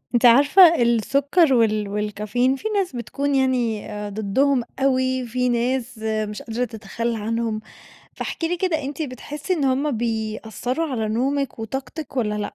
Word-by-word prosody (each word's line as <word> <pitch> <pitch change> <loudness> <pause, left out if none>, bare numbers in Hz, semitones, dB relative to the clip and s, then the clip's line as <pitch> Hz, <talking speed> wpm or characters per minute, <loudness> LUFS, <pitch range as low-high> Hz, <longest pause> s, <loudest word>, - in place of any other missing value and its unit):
أنتِ 240 - +3
عارفة، 290 +7 +7
السكر 275 - +3
وال 215 -3 +2
والكافيين، 210 +5 0
في 355 +11 -4
ناس 395 -8 -1
بتكون 280 +4 -2
يعني 250 -5 0
أ 210 0 -5
ضدّهم 235 +6 +1 0.2
أوي، 260 -1 +1
في 250 +2 0
ناس 245 +1 -1
مش 215 -1 -3
قادرة 235 +2 -2
تتخلّى 230 +1 -4
عنهم، 225 0 -2 0.5
فاحكِ - - -4
لي 345 +2 0
كده 340 -4 0
أنتِ 280 +4 -4
بتحسّي 290 +4 -5
إن 305 -5 -1
هُم 270 +3 +1
بيأثّروا 225 +5 -2
على 220 -3 -1
نومِك 270 +5 -1
وطاقتِك 270 +6 -6
والّا 215 -4 0
لأ؟ 210 -1 -4
245 Hz, 150 wpm, -22 LUFS, 220-275 Hz, 0.5 s, عارفة